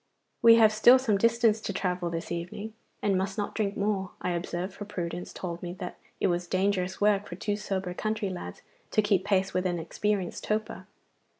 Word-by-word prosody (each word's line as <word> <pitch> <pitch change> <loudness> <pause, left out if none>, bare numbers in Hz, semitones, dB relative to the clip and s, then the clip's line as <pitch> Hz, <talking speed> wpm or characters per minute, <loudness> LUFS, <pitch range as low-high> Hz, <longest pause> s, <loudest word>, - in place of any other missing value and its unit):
'We 230 0 +9
have 220 -2 +6
still 240 +4 +7
some 225 -6 +1
distance 230 -1 +3
to 205 - -3
travel 180 -2 -1
this 165 0 -5
evening, 175 +6 -5 0.3
and 200 -2 +2
must 190 +1 -1
not 205 - -2
drink 205 -2 -1
more,' 200 -2 0
I 180 - -2
observed, 175 +2 -3
for 205 - -7
prudence 175 -3 -5
told 175 -2 -5
me 175 -1 -5
that 180 -1 -6 0.2
it - - +1
was 175 0 0
dangerous 190 0 0
work 205 -1 +3
for 175 - -6
two 205 +3 -1
sober 195 -3 -3
country 215 0 -2
lads 90 - -7 0.3
to 215 - +2
keep 200 -3 +2
pace 195 -1 +1
with 185 0 +1
an 175 -1 -1
experienced 190 +3 -2
toper. 215 0 -2
195 Hz, 195 wpm, -28 LUFS, 180-210 Hz, 0.3 s, We